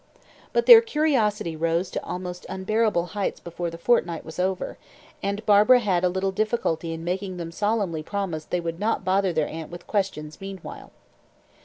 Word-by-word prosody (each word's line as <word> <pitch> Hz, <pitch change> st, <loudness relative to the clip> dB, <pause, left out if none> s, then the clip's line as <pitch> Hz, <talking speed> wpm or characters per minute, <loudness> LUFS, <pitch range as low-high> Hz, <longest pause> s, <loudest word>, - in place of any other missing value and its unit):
But 475 Hz, -, +1 dB
their 465 Hz, -2 st, +11 dB
curiosity 235 Hz, -, 0 dB
rose 165 Hz, +3 st, 0 dB
to -, -, -4 dB
almost 180 Hz, 0 st, -6 dB
unbearable 205 Hz, -1 st, +1 dB
heights 205 Hz, -1 st, -2 dB
before 170 Hz, 0 st, -5 dB
the 165 Hz, -, -8 dB
fortnight 170 Hz, -4 st, +1 dB
was 160 Hz, +2 st, -9 dB
over, 185 Hz, 0 st, -2 dB, 0.4 s
and 200 Hz, +2 st, -3 dB
Barbara 210 Hz, +4 st, +6 dB
had 190 Hz, -6 st, 0 dB
a 180 Hz, -, +4 dB
little 190 Hz, +2 st, -1 dB
difficulty 190 Hz, -6 st, -1 dB
in 165 Hz, 0 st, -5 dB
making 185 Hz, +1 st, -3 dB
them 170 Hz, -1 st, -5 dB
solemnly 205 Hz, -4 st, -1 dB
promise 170 Hz, -3 st, -4 dB
that -, -, -33 dB
they 180 Hz, -, 0 dB
would 165 Hz, 0 st, -4 dB
not 210 Hz, -2 st, 0 dB
bother 190 Hz, 0 st, +2 dB
their 155 Hz, -3 st, 0 dB
aunt 160 Hz, -1 st, -7 dB
with 175 Hz, 0 st, -10 dB
questions 170 Hz, -7 st, -3 dB
meanwhile. 195 Hz, -2 st, -8 dB
185 Hz, 175 wpm, -25 LUFS, 170-210 Hz, 0.4 s, their